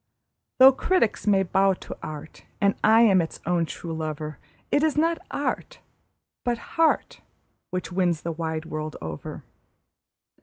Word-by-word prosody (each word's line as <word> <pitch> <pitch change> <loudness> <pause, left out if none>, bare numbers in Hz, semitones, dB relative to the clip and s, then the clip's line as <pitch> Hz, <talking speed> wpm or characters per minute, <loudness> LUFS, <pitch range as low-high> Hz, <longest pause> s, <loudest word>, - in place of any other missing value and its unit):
Though 260 +1 +9
critics 275 - 0
may 195 -2 +4
bow 190 +1 +2
to - - -9
art, 155 0 -8 0.2
and 200 0 +3
I 220 +1 +6
am 195 -6 +6
its 165 - -5
own 170 -1 +1
true 165 0 -6
lover, 155 -2 -4 0.3
It 290 - +3
is 310 -1 +1
not 330 +2 +2
art, - - -3 0.7
but 240 -1 0 0.2
heart, 325 -1 +1 0.5
which 180 -2 -4
wins 175 -3 +1
the 170 - -3
wide 160 -1 -3
world 155 -1 -5
over. - - -7
185 Hz, 145 wpm, -25 LUFS, 160-235 Hz, 0.7 s, Though